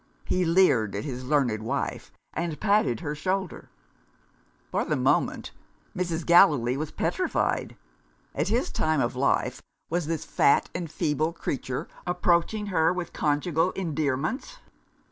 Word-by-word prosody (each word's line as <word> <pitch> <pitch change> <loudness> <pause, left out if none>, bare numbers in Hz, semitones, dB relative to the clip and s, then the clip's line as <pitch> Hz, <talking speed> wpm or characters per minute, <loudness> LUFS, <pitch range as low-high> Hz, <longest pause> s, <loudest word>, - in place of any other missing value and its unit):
He 185 -1 +1
leered 145 - +3
at 105 - -3
his 130 -2 -5
learned 125 -6 +1
wife, 135 +6 -3 0.2
and 165 -2 -3
patted 200 - +2
her 145 - -3
shoulder! 185 +5 -3 1.0
For - - +1
the - - -1
moment, - - +1 0.4
Mrs. 175 -3 -2
Gallilee 145 -8 +5
was 150 +2 -3
petrified. - - -1 0.6
At 150 +5 -1
his 230 +5 0
time 155 -1 +1
of 120 0 0
life, 135 +2 0 0.3
was 170 -2 0
this 160 -1 -2
fat 140 - +3
and 175 -2 -4
feeble 155 0 -1
creature 130 -5 -4 0.2
approaching 180 +4 +1
her 160 -1 +4
with 180 -2 -4
conjugal 155 +4 +1
endearments? 155 - -2
155 Hz, 130 wpm, -26 LUFS, 140-175 Hz, 1.0 s, Gallilee